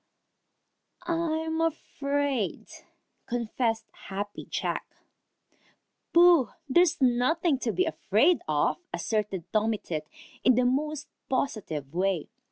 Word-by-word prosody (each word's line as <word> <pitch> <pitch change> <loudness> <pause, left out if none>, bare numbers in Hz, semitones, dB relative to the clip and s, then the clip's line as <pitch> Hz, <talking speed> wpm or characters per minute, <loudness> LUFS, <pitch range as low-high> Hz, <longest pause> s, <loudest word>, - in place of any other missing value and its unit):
"I 330 -2 0
I'm 320 0 -1
afraid," 285 - -1 0.6
confessed 230 -1 -1 0.2
Happy 205 +1 -5
Jack. - - -3 1.2
"Pooh! 340 - +6 0.2
There's 345 +4 +4
nothing 270 +4 +2
to 235 - -1
be 370 - +1
afraid 320 - +2
of," 150 -1 +1
asserted 210 -5 -2
Tommy 215 0 +2
Tit 155 -5 -5 0.4
in 255 - +5
the 250 +1 +3
most 300 +4 0 0.2
positive 175 - -2
way. 185 -2 0
250 Hz, 100 wpm, -28 LUFS, 210-315 Hz, 1.2 s, Pooh